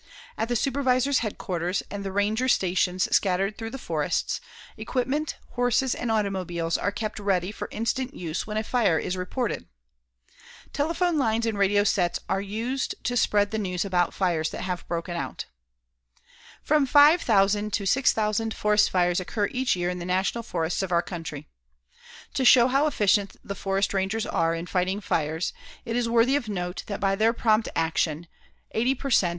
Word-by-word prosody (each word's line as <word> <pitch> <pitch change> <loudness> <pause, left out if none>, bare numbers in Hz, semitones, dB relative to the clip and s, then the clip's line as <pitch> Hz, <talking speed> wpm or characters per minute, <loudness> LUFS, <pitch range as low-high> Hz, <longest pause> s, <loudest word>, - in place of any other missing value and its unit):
At 225 - -2
the 240 - -1
supervisor's 265 +1 +2
headquarters 185 -4 -2
and 205 -1 -5
the 195 - -4
ranger 210 +6 +1
stations 185 -4 +2
scattered 195 +1 +1
through 225 +1 -6
the 270 - -6
forests, - - -2 0.3
equipment, 270 +4 -2
horses 245 +1 +1
and 245 - -4
automobiles 185 -6 -1
are 200 - 0
kept 215 +1 -4
ready 195 -2 0
for - - -6
instant 250 +3 -2
use 165 +1 -4
when 210 0 -3
a 215 - 0
fire 215 -8 +2
is 180 +4 -2
reported. 205 +6 -3 1.1
Telephone 335 +2 0
lines 225 -3 +1
and 225 -2 -1
radio 200 0 +3
sets 180 -4 +1
are 195 - 0
used 230 +6 -3
to 245 - -1
spread 205 -3 +2
the 220 - -1
news 180 -2 -2
about 180 -2 +1
fires 170 -4 0
that - - -6
have 180 -1 -4
broken 170 +1 -3
out. - - -4 1.2
From 300 -2 +2
five 295 +5 +6
thousand 205 0 +2
to 200 - -1
six 260 +7 +3
thousand 220 +1 -1
forest 210 0 +3
fires 180 -1 +2
occur 205 +2 -2
each 255 -3 +1
year 175 0 -1
in 180 - -5
the 175 - -5
National 190 +6 0
Forests 170 -5 -2
of 190 -2 -3
our 170 0 +3
country. 160 -4 -7 0.9
To 265 - 0
show 245 -1 +7
how 275 +4 +2
efficient 205 -6 +1
the 200 - -5
forest 195 +1 -1
rangers 195 +3 -1
are 165 0 0
in 165 +1 -5
fighting 185 +2 -1
fires, 160 -4 -1 0.3
it 230 - -3
is 240 -1 0
worthy 235 +3 +4
of 245 -6 -2
note 180 -2 -4
that 200 - -4
by 195 -1 +1
their 220 +3 +3
prompt 220 -2 +2
actions, 160 0 0 0.5
80 245 +4 +1
per 275 +2 -5
cent. 185 -6 +4
205 Hz, 175 wpm, -26 LUFS, 180-240 Hz, 1.2 s, show